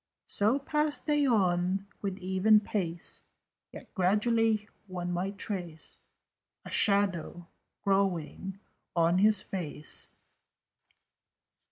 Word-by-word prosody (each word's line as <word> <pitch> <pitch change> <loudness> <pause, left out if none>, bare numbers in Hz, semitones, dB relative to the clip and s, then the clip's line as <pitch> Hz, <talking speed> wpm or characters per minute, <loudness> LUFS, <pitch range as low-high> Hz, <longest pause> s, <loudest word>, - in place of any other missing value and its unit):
So 215 +6 +3
passed 300 +1 -1
they 295 -2 +2
on 190 -3 +2 0.2
with 195 -2 -3
even 190 +3 +4
pace: 175 -5 -4 0.5
Yet - - -12
gradually 215 +3 +2 0.2
one 180 -1 -4
might 190 +3 -2
trace 175 -7 -5 0.6
A - - -8
shadow 195 -4 +2 0.4
growing 195 -1 0 0.4
on 170 +1 +3
his 210 -1 +4
face. 155 -5 -3
195 Hz, 90 wpm, -30 LUFS, 180-215 Hz, 0.6 s, even